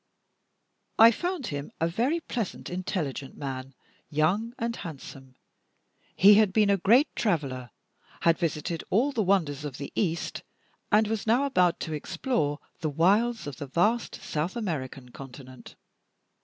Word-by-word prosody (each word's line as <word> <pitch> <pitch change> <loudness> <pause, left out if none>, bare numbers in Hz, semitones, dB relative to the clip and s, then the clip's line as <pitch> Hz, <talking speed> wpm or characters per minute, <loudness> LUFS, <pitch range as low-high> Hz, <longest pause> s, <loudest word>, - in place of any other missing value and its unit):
I 225 +1 +9
found 350 - -3
him 145 0 -5
a 165 - +2
very 250 - 0
pleasant, 230 - -4
intelligent 170 -7 -4
man, 135 -1 -6 0.3
young 195 +11 0
and 230 0 -2
handsome. 135 -4 -9 0.8
He 200 +3 +8
had 210 -2 +5
been 210 0 +3
a 200 - +3
great 240 - +4
traveler; 135 - -1 0.5
had 170 0 +3
visited 165 0 -2
all 245 +9 +2
the 235 - 0
wonders 170 -8 +1
of 140 -3 -6
the 140 - -6
East; 170 -4 -2 0.5
and 215 +1 +5
was 220 0 -3
now 240 +5 +4
about 180 -11 +2
to 160 - -3
explore 150 - -1 0.2
the 155 - -1
wilds 205 +10 +2
of 145 -3 -6
the 145 - -6
vast 210 - +1
South 160 +6 -3
American 135 - -4
Continent. 130 0 -11
175 Hz, 140 wpm, -27 LUFS, 145-220 Hz, 0.8 s, I